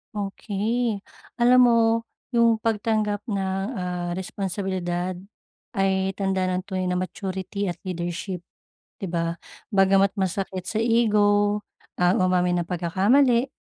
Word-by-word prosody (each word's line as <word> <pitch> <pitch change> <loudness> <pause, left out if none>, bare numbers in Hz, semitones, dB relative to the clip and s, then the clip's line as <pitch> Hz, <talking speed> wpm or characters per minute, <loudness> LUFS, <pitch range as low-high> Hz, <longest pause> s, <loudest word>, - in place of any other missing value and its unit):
Okey. 210 +2 -1 0.4
Alam 250 +1 +6
mo, 240 -1 +5 0.6
yung 230 -1 +4
pagtanggap 215 -2 0
ng, 190 -1 -1 0.2
ah, 180 -1 -3
responsibilidad 185 -1 -3 0.6
ay 195 -2 +1
tanda 190 -1 0
ng 185 +1 -3
tunay 185 -2 -2
na 180 0 0
maturity 190 +1 -3
at - - -10
leadership, 175 +1 -4 0.6
di 195 - -4
ba? 170 0 -1 0.4
Bagamat 195 0 +4
masakit 185 0 -2
sa 220 - -1
ego 210 -3 +3 0.4
ang 180 +1 +3
umamin 180 -1 +2
ng - - -17
pagkakamali, 235 +9 +3
195 Hz, 115 wpm, -24 LUFS, 180-210 Hz, 0.6 s, Alam